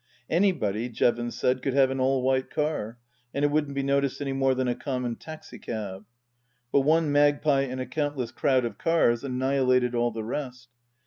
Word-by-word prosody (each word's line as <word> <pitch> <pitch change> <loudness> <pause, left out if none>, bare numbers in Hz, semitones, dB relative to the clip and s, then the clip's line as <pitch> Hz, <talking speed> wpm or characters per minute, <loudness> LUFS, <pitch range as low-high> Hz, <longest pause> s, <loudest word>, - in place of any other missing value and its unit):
Anybody, 125 - +1
Jevons 120 +1 0
said, 130 0 +1
could 135 0 -1
have 135 -1 +4
an 135 - -3
all 130 0 +1
white 130 0 +1
car, 150 -7 -2 0.4
and 140 +1 +2
it 145 - +2
wouldn't 150 -2 0
be 140 - -1
noticed 140 -1 0
any 140 -2 -2
more 135 -1 +2
than 130 0 0
a 120 - +1
common 125 -3 -3
taxi 155 +4 -11
cab. 105 -3 -6 0.7
But - - +4
one 155 +2 +2
magpie 145 -1 +3
in 130 0 -5
a 130 - -2
countless 145 -5 -2
crowd 130 -3 +1
of 110 -4 -6
cars 140 -8 +2
annihilated 130 -1 +1
all 120 0 +1
the 110 -1 -5
rest. 125 0 -5
130 Hz, 185 wpm, -26 LUFS, 120-145 Hz, 0.7 s, have